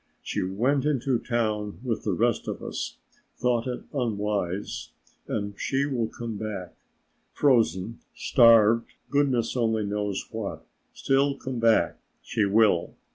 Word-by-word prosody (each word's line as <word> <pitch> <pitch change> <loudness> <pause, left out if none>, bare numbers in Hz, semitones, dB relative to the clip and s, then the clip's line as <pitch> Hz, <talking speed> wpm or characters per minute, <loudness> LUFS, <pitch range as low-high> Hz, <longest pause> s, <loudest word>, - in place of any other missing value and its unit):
She - - -2
went 120 +10 +1
into 135 -4 +1
town 110 -4 -1
when 120 -4 -1
the 105 - 0
rest 115 +5 +1
of - - -4
us - - -4 0.4
thought 125 -1 +1
it 125 -1 -4
unwise 105 -6 -2 0.3
and 100 -1 -2
she 140 0 0
will 125 -6 -1
come 115 -1 -6
back, 100 -5 -5 0.6
frozen, 115 - +2 0.2
starved, 115 -2 +5 0.2
goodness 135 -5 +1
only 110 -3 +1
knows 100 -1 -2
what, 110 -3 -5 0.3
still 140 +1 +1
come 130 -2 -5
back 115 -1 +3 0.2
she 110 -3 0
will. 100 -4 +3
115 Hz, 130 wpm, -26 LUFS, 105-125 Hz, 0.6 s, starved